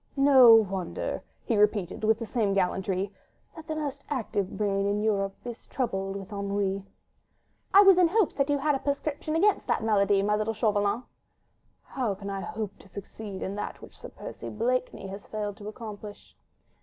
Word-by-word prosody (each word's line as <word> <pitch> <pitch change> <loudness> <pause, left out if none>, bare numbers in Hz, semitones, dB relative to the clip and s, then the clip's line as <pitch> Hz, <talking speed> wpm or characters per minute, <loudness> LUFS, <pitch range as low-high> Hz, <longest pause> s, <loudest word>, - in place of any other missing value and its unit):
"No 265 -4 +8
wonder," 195 -5 -1 0.2
he 230 - +1
repeated, 210 -2 +1
with 220 0 +4
the 230 - -5
same 215 -3 0
gallantry, 190 +1 0 0.4
"that 320 -1 -11
the 310 - -3
most 285 -2 -4
active 210 -8 -2
brain 200 -1 0
in 205 +1 0
Europe 195 -2 0
is 240 -1 -8
troubled 195 -6 -2
with 200 +1 -7
ennui." 200 -1 -1 0.9
"I 400 +1 +8
was 385 -2 +7
in 355 - +6
hopes 405 +1 +2
that 275 0 0
you 290 - +3
had 295 +2 +1
a 270 - 0
prescription 290 +2 -2
against 405 +5 +2
the - - +2
malady, 200 -2 +2
my 210 +1 +2
little 215 +1 -1
Chauvelin." 210 +1 +1 0.8
"How 240 -7 -2
can 200 +1 -6
I 195 0 -3
hope 210 -1 -5
to - - -16
succeed 200 0 -8
in 190 - -3
that - - -5
which - - -13
Sir - - -10
Percy - - -8
Blakeney 245 +1 -1
has 195 +1 -8
failed 210 -1 -4
to 205 - -9
accomplish?" 210 -2 -9
210 Hz, 180 wpm, -28 LUFS, 200-255 Hz, 0.9 s, No